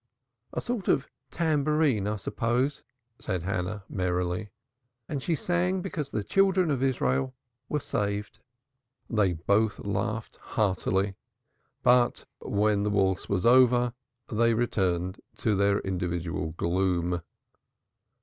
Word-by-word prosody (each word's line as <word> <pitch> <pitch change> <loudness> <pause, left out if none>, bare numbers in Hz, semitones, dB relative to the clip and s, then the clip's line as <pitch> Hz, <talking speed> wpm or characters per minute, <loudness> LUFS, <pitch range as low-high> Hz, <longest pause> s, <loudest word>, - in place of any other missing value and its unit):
"A - - -3
sort 235 -6 -3
of 135 - +2 0.2
tambourine, 150 - +1
I 105 - 0
suppose," 120 +6 -1 0.4
said 90 -3 -3
Hannah 95 +2 -2
merrily, 90 +1 -1 0.6
"and 145 -3 -3
she 165 +4 0
sang 180 +4 0
because 155 -7 -3
the 105 -5 -2
children 190 - +3
of 135 -3 0
Israel 130 - +1 0.3
were 150 - 0
saved." 105 -2 -2 0.7
They 105 -5 +3
both 100 +6 +1
laughed 105 +2 -2
heartily, 95 -1 0 0.7
but 125 0 +4
when 105 0 +1
the 105 - +1
waltz 95 -3 +1
was 100 0 0
over 125 -1 +5 0.3
they 115 +1 +2
returned 95 -5 0 0.2
to 110 - +1
their 100 0 +3
individual 85 -4 -2
gloom. 90 0 0
105 Hz, 115 wpm, -28 LUFS, 95-130 Hz, 0.7 s, over